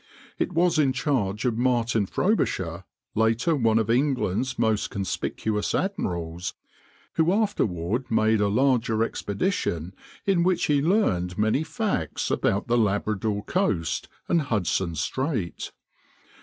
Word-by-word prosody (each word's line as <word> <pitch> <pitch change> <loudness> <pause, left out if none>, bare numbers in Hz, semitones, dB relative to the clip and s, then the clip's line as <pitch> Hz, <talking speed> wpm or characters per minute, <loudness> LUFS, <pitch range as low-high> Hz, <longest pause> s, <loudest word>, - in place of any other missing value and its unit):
It - - 0
was 170 -1 +3
in 135 -3 +3
charge 125 -6 -1
of 120 -2 0
Martin 120 -4 +1
Frobisher, 95 - 0 0.3
later 115 +8 +2
one 115 -5 +2
of 110 -2 +1
England's 130 -2 0
most 110 -2 +1
conspicuous 105 +2 -2
admirals, 90 - -2 0.6
who 160 +2 +4
afterward 125 - 0
made 110 -1 +3
a 105 - +3
larger 115 -1 +2
expedition 100 - -2 0.3
in 195 -3 +3
which 180 0 +2
he 145 -2 +2
learned 95 - +1
many 110 +8 +2
facts 160 - -2
about 100 - +1
the 120 0 +3
Labrador 105 0 0
coast 105 - -1 0.2
and 170 - +3
Hudson 95 - -1
Strait. 105 - -2
115 Hz, 120 wpm, -25 LUFS, 100-145 Hz, 0.6 s, who